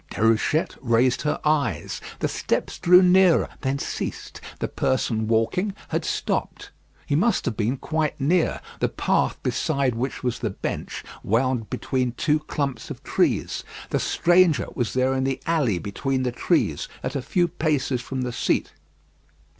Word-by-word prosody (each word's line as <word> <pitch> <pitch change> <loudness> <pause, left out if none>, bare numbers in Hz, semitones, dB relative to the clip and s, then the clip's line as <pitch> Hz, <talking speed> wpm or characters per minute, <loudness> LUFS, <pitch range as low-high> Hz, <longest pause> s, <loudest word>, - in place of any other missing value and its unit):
Déruchette 115 +8 +1
raised 125 +1 +2
her 150 - -1
eyes. 140 - 0 0.2
The - - +2
steps - - -2
drew 180 +2 +7
nearer, 180 -1 +5
then 135 0 0
ceased. - - -5 0.2
The - - -2
person 115 -4 0
walking 180 - +1
had - - -1
stopped. - - -2 0.3
He 145 - 0
must 200 +7 +2
have 115 - -1
been 115 +5 0
quite 155 +1 -2
near. 160 +5 +1 0.2
The - - +1
path - - 0
beside 135 -3 0
which 125 +4 -3
was 125 -1 -1
the 110 - -1
bench 95 - -5 0.2
wound 120 0 0
between 125 -2 -1
two 150 +4 +1
clumps 140 -5 -3
of - - -8
trees. - - 0 0.3
The - - +1
stranger 175 -2 +3
was 120 -4 -2
there 130 +1 +2
in 130 0 0
the 135 0 -1
alley 150 - +1
between 130 +8 -2
the 125 - 0
trees, 120 - 0 0.2
at 130 +2 -3
a 135 - -1
few 175 +7 +1
paces 150 -7 0
from 130 +1 -4
the 125 -1 -3
seat. - - 0
135 Hz, 155 wpm, -24 LUFS, 120-155 Hz, 0.3 s, drew